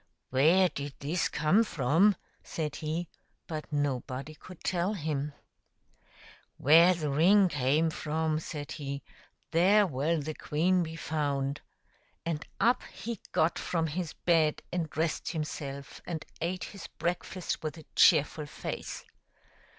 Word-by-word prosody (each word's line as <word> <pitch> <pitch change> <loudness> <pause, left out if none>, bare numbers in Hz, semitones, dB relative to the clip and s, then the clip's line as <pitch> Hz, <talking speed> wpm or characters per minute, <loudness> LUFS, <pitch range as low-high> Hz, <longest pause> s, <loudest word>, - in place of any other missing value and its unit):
" - - -52
Where 165 +8 +5
did 140 -4 -6
this 160 +5 -1
come 155 +9 +3
from 165 - +3
?" - - -38
said 155 -3 -4
he; 160 +3 -3 0.4
but 155 -1 -6
nobody 140 0 -2
could 185 +3 -13
tell 180 +3 0
him. 150 -4 -2 0.6
" - - -38 0.5
Where 165 +5 +7
the 155 -4 -2
ring 185 +7 +5
came 150 +3 +2
from," 155 0 -1
said 150 -2 -6
he, 140 -2 -5 0.2
" - - -38
there 195 +5 +5
will 155 +1 0
the 155 +2 -4
queen 175 +5 +1
be 160 -1 -4
found/' 145 -3 -1 0.7
And 165 -2 -2 0.2
up 240 +2 +4
he 230 -3 -5
got 160 +2 +2
from 165 -2 0
his 165 +1 -3
bed 160 -3 +2
and 170 -3 -1
dressed 160 +3 -1
himself, 140 -3 -5
and 165 -3 -4 0.2
ate 180 +2 -2
his 200 - -8
breakfast 175 +1 -3
with 155 +1 -4
a 160 - -12
cheerful 150 +1 +5
face. - - -6
160 Hz, 145 wpm, -30 LUFS, 145-175 Hz, 0.7 s, Where